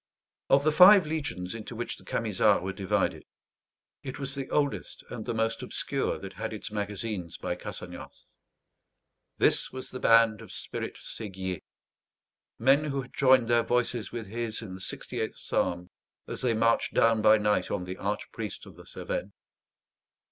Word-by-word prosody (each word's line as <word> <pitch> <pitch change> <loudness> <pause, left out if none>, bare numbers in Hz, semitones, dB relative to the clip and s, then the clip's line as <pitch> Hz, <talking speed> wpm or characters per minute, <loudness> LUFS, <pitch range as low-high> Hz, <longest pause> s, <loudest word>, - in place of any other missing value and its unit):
Of 135 +1 +5
the 155 - +3
five 185 +3 +9
legions 135 - -3
into 115 +1 -7
which 120 +1 -3
the - - -16
Camisards 105 -3 +2
were 95 0 -3
divided, 100 +1 0 0.8
it 135 -1 -6
was 135 -1 -4
the 135 -1 -5
oldest 145 -2 -1
and 115 -3 -5
the 120 - -1
most 115 0 0
obscure - - -2
that 95 -1 -8
had 95 - -4
its 110 +1 -6
magazines 105 -3 -3
by - - -2
Cassagnas. - - -8 1.1
This - - +3
was 130 0 -7
the 130 - -6
band 115 -2 +5
of 115 - -11
Spirit - - -5
Séguier; 95 -4 -6 1.0
men 135 +5 +4
who 140 -2 -2
had 125 - -15
joined 130 -3 +5
their 120 0 +4
voices 120 -1 0
with 115 -2 -5
his 115 +2 -3
in 95 -4 -7
the 95 - -9
68th - - -4
Psalm 90 +1 -2 0.4
as - - -4
they 120 -3 +2
marched 115 +1 +2
down 115 -1 +4
by 110 0 +7
night 105 -3 +1
on 90 - -2
the 90 +1 -6
archpriest 105 +1 -4
of - - -12
the - - -14
Cevennes. 95 - -4
115 Hz, 160 wpm, -28 LUFS, 105-130 Hz, 1.1 s, five